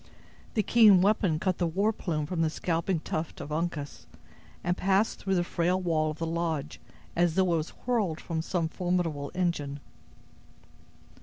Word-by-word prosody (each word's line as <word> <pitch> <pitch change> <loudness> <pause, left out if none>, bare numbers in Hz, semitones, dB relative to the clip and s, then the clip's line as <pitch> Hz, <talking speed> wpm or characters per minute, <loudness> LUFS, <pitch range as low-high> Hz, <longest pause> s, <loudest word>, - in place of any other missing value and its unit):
The 215 - +2
keen 210 -6 +6
weapon 195 -5 +2
cut 185 +2 -1
the 175 - +2
war 200 +7 +1
plume 155 -7 -2
from 165 +2 -2
the 160 - +2
scalping 165 +1 -1
tuft 160 0 -4
of 145 - -7
Uncas, 155 -2 -3 0.6
and 175 - +1
passed 195 +3 +1
through 195 -1 0
the 175 - +2
frail 175 +2 0
wall 160 -4 +1
of 155 - -5
the 165 - -2
lodge 165 -3 -2 0.3
as 170 -1 +2
though 185 -2 +3
it - - +3
were 155 +1 -6
hurled 190 -9 0
from 165 -2 -3
some 170 0 -1
formidable 165 -5 -1
engine. 150 -6 -1
170 Hz, 165 wpm, -28 LUFS, 160-185 Hz, 0.6 s, keen